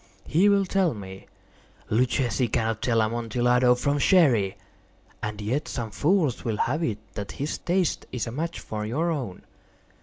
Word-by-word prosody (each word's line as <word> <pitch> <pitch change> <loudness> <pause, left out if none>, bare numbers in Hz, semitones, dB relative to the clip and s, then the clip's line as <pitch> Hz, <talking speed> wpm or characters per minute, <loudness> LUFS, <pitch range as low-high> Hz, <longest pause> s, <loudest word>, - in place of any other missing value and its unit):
He 185 +7 +4
will 200 -1 +3
tell 185 -6 +1
me—" 95 -2 -9 0.6
"Luchesi 125 +2 +1
cannot 110 -1 -1
tell 115 -3 +2
Amontillado 120 +2 +2
from 140 +3 0
Sherry." 130 - +4 0.6
"And 105 0 -4
yet 120 +8 -2
some 115 -4 -4
fools 155 - +1
will 110 -3 -1
have 145 +10 0
it 110 -9 -1 0.2
that 100 -2 -5
his 145 +3 -3
taste 180 -1 0
is 125 -4 -2
a 115 - -5
match 165 +7 -3
for 105 -1 -5
your 155 +11 0
own." 125 - -4
125 Hz, 155 wpm, -26 LUFS, 110-155 Hz, 0.6 s, He